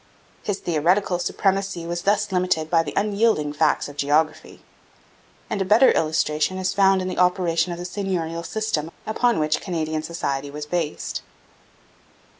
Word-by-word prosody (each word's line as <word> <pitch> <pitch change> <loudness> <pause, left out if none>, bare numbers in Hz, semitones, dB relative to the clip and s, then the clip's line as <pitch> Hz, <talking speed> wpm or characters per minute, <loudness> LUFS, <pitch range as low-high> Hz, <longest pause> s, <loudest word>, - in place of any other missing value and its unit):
His 205 -2 -2
theoretical 175 +3 +1
supremacy 195 -1 -1
was 175 +1 -3
thus 205 +1 +1
limited 180 -4 0
by 165 -2 +5
the 145 -3 -6
unyielding 200 -7 +1
facts 150 +2 +1
of 145 0 -11
geography. 150 +3 0 0.8
And 215 -5 -2
a - - +3
better 215 +7 +6
illustration 155 +2 0
is 185 0 -1
found 195 -1 +4
in - - -3
the 185 - -3
operation 180 -1 +2
of 170 - -4
the 175 - -6
seigneurial 180 -4 -3
system 215 -6 -2 0.2
upon 235 +2 +1
which 155 0 +1
Canadian 160 -4 -2
society 145 -4 -3
was 150 +1 -6
based. 160 -1 -3
175 Hz, 150 wpm, -23 LUFS, 155-195 Hz, 0.8 s, better